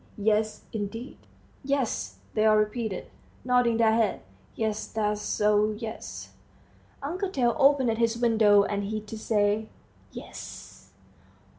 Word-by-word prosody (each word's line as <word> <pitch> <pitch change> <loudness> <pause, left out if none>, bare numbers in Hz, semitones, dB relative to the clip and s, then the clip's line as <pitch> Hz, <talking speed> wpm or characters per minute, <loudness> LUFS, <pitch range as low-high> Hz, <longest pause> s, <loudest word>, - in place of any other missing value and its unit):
Yes, 215 +1 +1
indeed." 225 +4 -5 0.4
"Yes," 275 -3 -1 0.2
they 215 - +2
all 215 0 +5
repeated, 215 -1 -1 0.4
nodding 245 -2 +3
their 225 -1 +4
heads, 220 -4 +1 0.3
"yes 215 -1 -2
that's 210 -1 -1
so 210 0 +2
yes." 225 0 -7 0.7
Uncle 365 +7 -2
Tail 245 -9 +1
opened 270 -5 +4
his 230 0 +2
window, 220 -4 +5
and 200 0 -2
he 215 +2 -2
too 215 +1 -9
said, 215 0 +1 0.4
"Yes." - - -10
220 Hz, 120 wpm, -27 LUFS, 210-235 Hz, 0.7 s, all